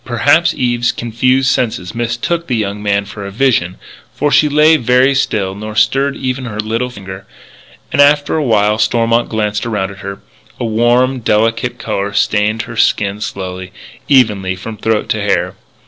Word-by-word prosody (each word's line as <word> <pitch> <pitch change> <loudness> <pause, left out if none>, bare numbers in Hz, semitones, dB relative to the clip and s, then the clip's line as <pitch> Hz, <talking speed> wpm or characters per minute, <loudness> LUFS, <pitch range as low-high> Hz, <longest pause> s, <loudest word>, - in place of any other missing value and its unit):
Perhaps 145 +8 +2
Eve's 120 -1 +1
confused 125 +3 +1
senses 110 -7 -2
mistook 120 +9 -2
the 125 - -1
young 105 -2 -3
man 100 -1 0
for 100 +1 -9
a 100 - -6
vision; 100 -5 0 0.4
for 145 +1 0
she 150 - +4
lay 150 +2 +5
very 125 0 +3
still, 105 -8 -1
nor 105 +2 -7
stirred 135 +5 +2
even 130 0 -3
her 110 -3 -6
little 115 +3 -2
finger. 95 -4 -10 0.7
After 145 +1 +3
a 155 - 0
while 105 -3 +2
Stormont 115 +1 +1
glanced 105 -2 -1
around 105 -4 -2
at 100 - -13
her. 100 0 -7 0.4
A - - -2
warm, 120 +4 +2
delicate 115 +2 0
colour 100 -3 -3
stained 105 +2 +1
her 115 - -9
skin 100 -1 +1
slowly, 95 -2 -6 0.4
evenly, 105 -9 +2
from 110 +4 -8
throat 110 0 -1
to - - -1
hair. - - 0
115 Hz, 160 wpm, -15 LUFS, 105-125 Hz, 0.7 s, lay